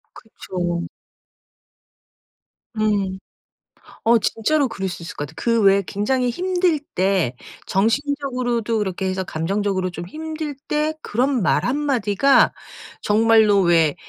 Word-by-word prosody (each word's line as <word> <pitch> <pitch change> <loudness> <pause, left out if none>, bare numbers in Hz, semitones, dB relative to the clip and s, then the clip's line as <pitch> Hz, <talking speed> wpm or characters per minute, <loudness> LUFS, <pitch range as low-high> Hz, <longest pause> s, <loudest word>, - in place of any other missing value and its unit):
그쵸. 175 -5 -4 1.9
음. 205 -4 0 0.9
어. 230 +1 +5
진짜로 265 +7 +1
그럴 195 -3 -4
수 175 - -7
있을 170 - -8
것 145 - -4
같아. 160 - -15
그 230 -1 +1
왜 195 0 +5
굉장히 245 +5 0
힘들 360 0 0
때, 185 -9 +1 0.3
정신적으로도 245 0 0
그렇게 190 -2 -2
해서 185 0 -2
감정적으로 185 +3 -1
좀 175 0 -7
힘들 310 - -5
때 300 +1 0
그런 250 +2 0
말 - - +2
한마디가 270 -2 +2 0.5
정말로 215 -1 +4
왜, 165 -4 +3
215 Hz, 230 characters per minute, -21 LUFS, 190-270 Hz, 1.9 s, 어